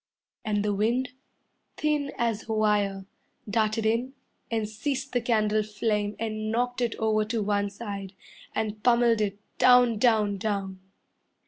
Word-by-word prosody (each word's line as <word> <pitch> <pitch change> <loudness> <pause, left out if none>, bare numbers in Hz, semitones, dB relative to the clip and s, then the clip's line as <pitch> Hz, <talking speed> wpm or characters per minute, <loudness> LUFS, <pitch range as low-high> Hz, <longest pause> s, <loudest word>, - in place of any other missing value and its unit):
And 210 -1 0
the 205 - +1
wind, 235 +5 +1 0.7
thin 300 -2 0
as 225 -2 -1
a - - 0
wire, 205 -3 +1 0.4
Darted 215 +1 0
in 235 +4 0 0.4
and 225 -2 -1
seized 270 +5 -3
the 245 - +2
candle 215 -2 +2
flame 210 0 -1
And 215 -1 -3
knocked 245 +2 -1
it 235 -2 0
over 215 -1 +1
to 220 0 -1
one 205 0 0
side 200 -2 -7 0.4
And 215 -1 -2
pummelled 235 -2 +4
it 200 -1 -1 0.2
down 245 -3 +6
down 215 -4 +3
down 195 -2 -2
215 Hz, 140 wpm, -27 LUFS, 210-235 Hz, 0.7 s, down